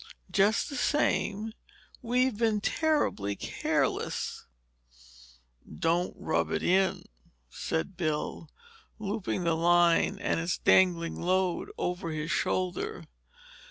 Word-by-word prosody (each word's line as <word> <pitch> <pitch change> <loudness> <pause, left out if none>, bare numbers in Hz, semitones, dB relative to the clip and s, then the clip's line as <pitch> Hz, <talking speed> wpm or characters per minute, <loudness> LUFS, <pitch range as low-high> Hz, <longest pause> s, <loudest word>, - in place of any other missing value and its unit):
"Just 205 +3 +3
the 285 - -6
same, 220 -6 0 0.5
we've 250 0 +1
been 220 -1 +1
terribly 205 - 0
careless!" - - -2 1.3
"Don't 170 - 0
rub 85 -1 0
it - - -2
in," 190 +1 +2 0.5
said 165 - -3
Bill, 155 -1 -2 0.5
looping 205 -3 -3
the 170 -1 +2
line 170 +1 +3
and - - -1
its 170 +2 -1
dangling 170 -3 +3
load 185 0 0
over 175 -1 -2
his 155 0 -3
shoulder. 185 - -1
180 Hz, 100 wpm, -29 LUFS, 165-215 Hz, 1.3 s, Just